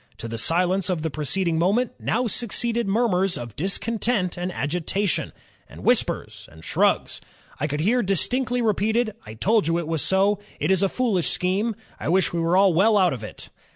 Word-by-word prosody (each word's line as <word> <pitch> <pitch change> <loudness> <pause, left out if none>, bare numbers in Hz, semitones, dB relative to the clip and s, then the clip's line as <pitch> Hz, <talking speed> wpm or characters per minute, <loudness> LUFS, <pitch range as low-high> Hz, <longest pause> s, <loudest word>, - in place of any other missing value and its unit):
To 115 - -6
the 115 0 -5
silence 180 +8 +1
of 170 -4 -1
the 160 - -2
preceding 160 +3 -1
moment, 210 +8 +1
now 245 +3 0
succeeded 235 0 -1
murmurs 195 -4 +1
of 120 -3 -8
discontent 200 +2 -1
and 180 +1 -3
agitation, 175 +5 -1 0.4
and - - -12
whispers, - - 0
and 80 - -15
shrugs. - - +1 0.4
I 150 - 0
could 150 0 -2
hear 235 +8 +2
distinctly 245 +5 0
repeated, 220 +1 +1
'I 110 - -8
told 210 - +2
you 165 0 +1
it 170 -2 -3
was 160 -2 -1
so; 195 +1 +2 0.2
it - - +1
is 190 - +3
a 195 - +2
foolish 215 -9 0
scheme; 200 +5 -1 0.2
I - - -3
wish 180 -1 +2
we 170 - -1
were 180 +4 +4
well 200 +5 +4
out 185 -5 +3
of 120 -4 -7
it.'" 105 - -9
190 Hz, 185 wpm, -24 LUFS, 165-220 Hz, 0.4 s, were